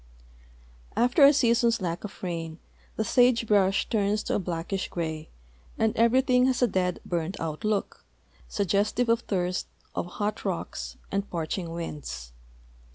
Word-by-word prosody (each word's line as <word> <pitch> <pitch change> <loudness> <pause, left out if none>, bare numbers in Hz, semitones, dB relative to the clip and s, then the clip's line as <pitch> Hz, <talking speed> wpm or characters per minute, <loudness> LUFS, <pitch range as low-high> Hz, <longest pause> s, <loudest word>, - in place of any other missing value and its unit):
After 245 +5 +4
a 280 - +9
season's 235 -4 +3
lack 175 -3 -3
of 210 - -9
rain 165 -3 -4 0.4
the 220 - 0
sage 245 +1 +4
brush 200 -2 +3
turns 210 -1 +1
to - - -2
a - - +2
blackish 180 +1 -3
gray 160 -2 -4 0.5
and 220 -1 +1
everything 250 +2 +4
has 255 -1 +1
a - - +5
dead, 180 -3 0
hurned 175 +2 -2
out 155 -2 -4
look, 215 -2 -1 0.4
suggestive 205 +5 +1
of 230 0 +4
thirst, 180 -5 -2 0.3
of - - -2
hot 210 +4 -3
rocks, - - -4
and 200 +1 -1
parching 170 +1 -3
winds. 145 - -6
200 Hz, 145 wpm, -27 LUFS, 170-230 Hz, 0.5 s, a